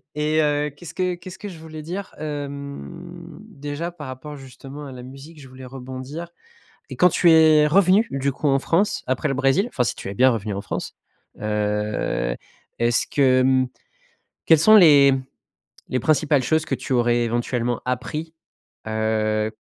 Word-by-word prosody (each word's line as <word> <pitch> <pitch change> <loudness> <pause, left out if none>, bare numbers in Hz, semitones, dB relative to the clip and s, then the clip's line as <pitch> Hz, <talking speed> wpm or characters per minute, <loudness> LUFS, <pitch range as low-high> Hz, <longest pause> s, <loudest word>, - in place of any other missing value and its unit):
Et 155 +1 +1
heu, 150 0 +1
qu'est-ce 145 +4 -11
que 180 -1 -1
qu'est-ce 185 +2 -11
que 210 - -6
je 175 - -10
voulais 160 -1 -9
dire? 185 +6 -6
Hem, 140 - -7
déjà 145 +4 -6
par 165 -4 -10
rapport, 130 +3 -8
justement, 135 +2 -10
à 135 - -8
la 125 -1 -9
musique, 135 +5 -12
je 135 - -12
voulais 130 0 -12
rebondir 130 +5 -7 0.6
et - - -7
quand 180 - +6
tu 175 - +4
es 155 -2 +6
revenu, 190 +6 +4
du 135 0 -1
coup, 145 - -4
en 135 - +3
France, 170 +8 0
après 130 +4 -1
le 135 - -1
Brésil, 140 - +2
enfin, 125 - -1
si - - -1
tu - - -8
es 100 - -5
bien 130 +5 +5
revenu 110 -3 -3
en 100 - -3
France, - - -5 0.5
heu, 105 - -1 0.4
est-ce 120 0 +1
que, 130 -3 +3
mmh, 130 0 +2 0.8
quelles 160 -2 +6
sont 215 +7 +7
les 145 -8 +7 0.8
les 130 - 0
principales 150 -1 +2
choses 155 +5 +1
que - - -1
tu 135 - -4
aurais 120 -1 +2
éventuellement 120 +1 -1
appris, 150 +6 -4 0.5
heu, 110 0 0
140 Hz, 170 wpm, -22 LUFS, 125-155 Hz, 0.8 s, sont